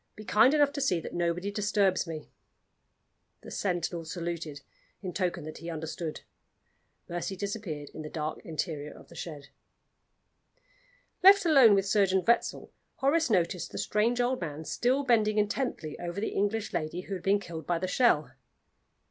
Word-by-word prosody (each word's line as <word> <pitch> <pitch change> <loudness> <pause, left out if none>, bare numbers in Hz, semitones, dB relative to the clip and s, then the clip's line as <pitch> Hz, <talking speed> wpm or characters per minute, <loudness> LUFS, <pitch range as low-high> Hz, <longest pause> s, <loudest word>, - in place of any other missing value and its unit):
Be 215 - -10
kind 220 +6 +5
enough 290 -1 +4
to 280 - -3
see 185 -11 +2
that - - -8
nobody 175 +3 -1
disturbs 200 -3 +1
me." 155 -2 -7 1.1
The - - -11
sentinel 175 -3 -2
saluted, 165 -3 -5 0.4
in 185 -2 -4
token 175 -3 -1
that 155 +1 -8
he 165 - -7
understood. 160 0 -5 0.9
Mercy 175 +3 -3
disappeared 195 -8 -5
in - - -7
the 155 - -6
dark 155 0 -4
interior 155 -2 -4
of - - -15
the - - -14
shed. 150 -4 -7 1.7
Left 395 +1 +8
alone 270 -10 +7
with 195 -1 +2
Surgeon 195 -2 +3
Wetzel, 235 - +1 0.2
Horace 295 +2 +2
noticed 175 -4 0
the - - -7
strange 230 +4 +1
old 245 -1 +1
man 155 -1 -5
still 255 - +1
bending 220 -4 +3
intently 210 - -1
over 175 +2 -4
the 215 - -1
English 205 +2 -1
lady 170 +1 -2
who 195 - -7
had 185 - -4
been 195 +3 +3
killed 165 -4 -8
by 175 - +1
the 185 +2 -2
shell. 180 - +3
185 Hz, 160 wpm, -29 LUFS, 165-215 Hz, 1.7 s, Left